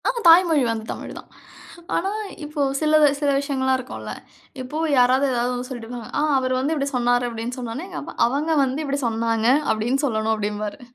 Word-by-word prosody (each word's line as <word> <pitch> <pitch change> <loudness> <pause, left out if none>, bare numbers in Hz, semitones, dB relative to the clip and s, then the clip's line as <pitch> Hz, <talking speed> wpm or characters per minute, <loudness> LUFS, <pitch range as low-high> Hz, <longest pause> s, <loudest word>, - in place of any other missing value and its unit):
ஆமா, 485 -1 -1
தாய்மொழி 330 -3 +6
வந்து 225 -1 -3
தமிழ்தான். - - -8 0.7
ஆனா 385 +3 0 0.3
இப்போ 295 0 -3 0.2
சிலது 305 -1 +5
சில 290 -1 +2
விஷயங்கள்லாம் 265 -2 0
இருக்கும்ல. 255 - -7 0.5
இப்பவு 305 +6 -3
யாராவது 255 +3 +4
ஏதாவது 245 0 0
ஒண்ணு 250 0 -5
சொல்லிட்டு 240 -3 -7
போவாங்க. 240 -3 -7
ஆ - - +2 0.2
அவரு 255 0 0
வந்து 280 +5 0
இப்படி 280 -2 -1
சொன்னாரு 245 0 +2
அப்படின்னு 230 +2 -5
சொன்னனோனே, 250 +7 -5
எங்கப்பா, 360 - -7
அவங்க 290 +6 -1
வந்து, 265 +1 -2
இப்படி 280 0 -2
சொன்னாங்க 225 0 0 0.2
அப்படின்னு 230 +5 0
சொல்லணும் 220 -3 0
அப்டிம்பாரு. 210 0 -4
255 Hz, 170 wpm, -22 LUFS, 230-290 Hz, 0.7 s, தாய்மொழி